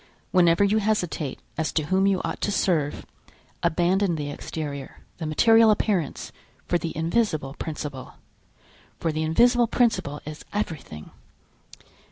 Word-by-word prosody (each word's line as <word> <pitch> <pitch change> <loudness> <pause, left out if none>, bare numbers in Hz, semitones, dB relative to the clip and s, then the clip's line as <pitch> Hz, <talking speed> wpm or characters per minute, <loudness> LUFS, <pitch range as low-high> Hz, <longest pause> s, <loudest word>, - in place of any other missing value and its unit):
Whenever 175 +1 +4
you 205 +2 +3
hesitate 180 -9 -1 0.2
as 160 - 0
to 155 - 0
whom 190 +5 +2
you 195 -2 +1
ought - - -4
to 205 - 0
serve, 165 -7 0 0.6
abandon 175 +2 +2
the 145 -2 -4
exterior, 145 -3 -6 0.2
the 160 - -3
material 225 +8 +5
appearance 195 -7 0 0.4
for 175 - +1
the 165 - -4
invisible 160 - 0
principle, 145 -4 -6 0.8
for 165 - 0
the 155 0 -2
invisible 235 +9 +4
principle 225 - +1
is 155 +1 -8
everything. 155 - -5
170 Hz, 130 wpm, -25 LUFS, 150-205 Hz, 0.8 s, material